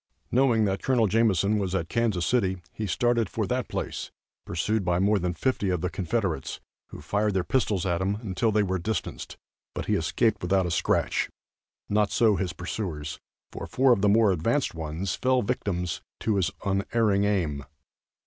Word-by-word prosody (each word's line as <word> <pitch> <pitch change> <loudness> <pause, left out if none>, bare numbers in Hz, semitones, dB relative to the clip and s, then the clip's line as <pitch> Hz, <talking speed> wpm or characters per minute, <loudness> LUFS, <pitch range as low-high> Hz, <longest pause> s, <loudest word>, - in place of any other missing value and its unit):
Knowing 120 -4 +3
that 95 -1 -1
Col. 125 -4 +3
Jameson 105 -1 +2
was 95 -2 -1
at 80 -4 -1
Kansas 110 -7 0
City, 95 -6 +1
he 110 - -3
started 120 0 +1
for 110 - -1
that 125 +4 -1
place, - - -4 0.4
pursued 105 +5 0
by 90 -1 +1
more 100 +3 +3
than 90 0 -1
fifty 125 -5 0
of 90 -3 0
the 90 0 -2
Confederates, 95 - -2 0.3
who - - -10
fired 100 +5 0
their 95 - +2
pistols 105 -4 0
at 85 -1 0
him 95 +2 0
until 110 +1 -1
they 105 0 +3
were 95 -1 -1
distanced, 110 +6 -4 0.4
but - - -3
he - - 0
escaped 115 -2 +1
without 95 +1 +2
a 85 - -2
scratch; - - +1 0.6
not 105 0 +2
so 110 -3 +3
his 95 -2 -1
pursuers, 85 -4 -5 0.3
for - - -6
four 130 -1 +4
of 105 - 0
the 105 - +4
more 110 0 +5
advanced 115 - 0
ones 80 +3 -3
fell 130 -1 +1
victims 95 -6 -2 0.2
to 110 -3 0
his 95 - +2 0.2
unerring 100 +1 +1
aim. 80 -9 0
100 Hz, 175 wpm, -27 LUFS, 90-110 Hz, 0.6 s, more